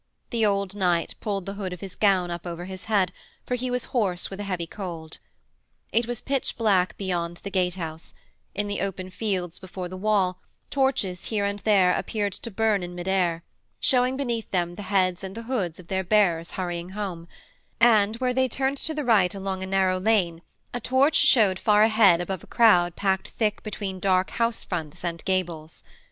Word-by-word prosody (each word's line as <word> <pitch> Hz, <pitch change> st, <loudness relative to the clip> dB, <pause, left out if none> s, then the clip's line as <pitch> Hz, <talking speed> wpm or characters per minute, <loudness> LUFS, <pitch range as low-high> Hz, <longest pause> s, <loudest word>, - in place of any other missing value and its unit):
The 230 Hz, -2 st, 0 dB
old 200 Hz, -1 st, 0 dB
knight 175 Hz, -4 st, +1 dB
pulled 200 Hz, -3 st, -3 dB
the 195 Hz, -, -4 dB
hood 195 Hz, -3 st, -4 dB
of 180 Hz, -, -8 dB
his 195 Hz, -2 st, -7 dB
gown 190 Hz, -4 st, +2 dB
up 170 Hz, +1 st, -5 dB
over 175 Hz, 0 st, -5 dB
his 190 Hz, 0 st, -8 dB
head, 200 Hz, -5 st, +2 dB, 0.3 s
for -, -, -3 dB
he 250 Hz, +1 st, -1 dB
was 250 Hz, 0 st, -1 dB
hoarse 195 Hz, -9 st, 0 dB
with 195 Hz, -, -7 dB
a -, -, -3 dB
heavy 180 Hz, -3 st, -2 dB
cold. 165 Hz, -4 st, -7 dB, 0.7 s
It 230 Hz, +1 st, +2 dB
was 240 Hz, -1 st, -3 dB
pitch 275 Hz, -1 st, -1 dB
black 195 Hz, -5 st, +2 dB
beyond 175 Hz, -3 st, -2 dB
the 200 Hz, -, -5 dB
gate 180 Hz, -2 st, +1 dB
house; 165 Hz, -2 st, -7 dB, 0.4 s
in 205 Hz, +2 st, -1 dB
the 205 Hz, -, -3 dB
open 185 Hz, -1 st, -4 dB
fields 185 Hz, -4 st, -3 dB
before 185 Hz, -1 st, -6 dB
the 185 Hz, -, -8 dB
wall 190 Hz, -2 st, +1 dB, 0.3 s
torches 260 Hz, -10 st, 0 dB
here 210 Hz, -3 st, -1 dB
and 200 Hz, 0 st, -2 dB
there 195 Hz, -4 st, +4 dB
appeared 205 Hz, -3 st, -2 dB
to 230 Hz, -, -7 dB
burn 215 Hz, -1 st, +1 dB
in 175 Hz, 0 st, -6 dB
mid 175 Hz, +1 st, -6 dB
air, 175 Hz, -3 st, +1 dB, 0.4 s
showing 255 Hz, 0 st, +3 dB
beneath 235 Hz, -5 st, -2 dB
them 175 Hz, -2 st, 0 dB
the 185 Hz, -, -8 dB
heads 185 Hz, -2 st, +2 dB
and 190 Hz, +1 st, -6 dB
the 230 Hz, -, -6 dB
hoods 205 Hz, -10 st, -2 dB
of 175 Hz, -, -13 dB
their 190 Hz, +1 st, -1 dB
bearers 175 Hz, -4 st, +2 dB
hurrying 175 Hz, -1 st, -3 dB
home, 180 Hz, -5 st, -4 dB, 0.5 s
and, 220 Hz, -2 st, +5 dB
where 250 Hz, +1 st, 0 dB
they 260 Hz, +1 st, +2 dB
turned 270 Hz, +3 st, 0 dB
to 315 Hz, +2 st, -2 dB
the 300 Hz, -2 st, -2 dB
right 200 Hz, -6 st, +4 dB
along 190 Hz, -1 st, -3 dB
a 190 Hz, -, -4 dB
narrow 190 Hz, -1 st, +2 dB
lane, 185 Hz, -5 st, +1 dB, 0.3 s
a 245 Hz, -, -2 dB
torch 265 Hz, +5 st, +3 dB
showed 210 Hz, -9 st, +5 dB
far 210 Hz, -1 st, +4 dB
ahead 215 Hz, -6 st, +5 dB
above 180 Hz, 0 st, -4 dB
a -, -, -14 dB
crowd 180 Hz, -7 st, +4 dB
packed 190 Hz, -1 st, 0 dB
thick 215 Hz, -2 st, -1 dB
between 200 Hz, -3 st, -5 dB
dark 185 Hz, -1 st, +2 dB
house 230 Hz, 0 st, 0 dB
fronts 160 Hz, -2 st, -5 dB
and 170 Hz, -1 st, -3 dB
gables. 170 Hz, -4 st, -2 dB
195 Hz, 200 wpm, -25 LUFS, 180-220 Hz, 0.7 s, and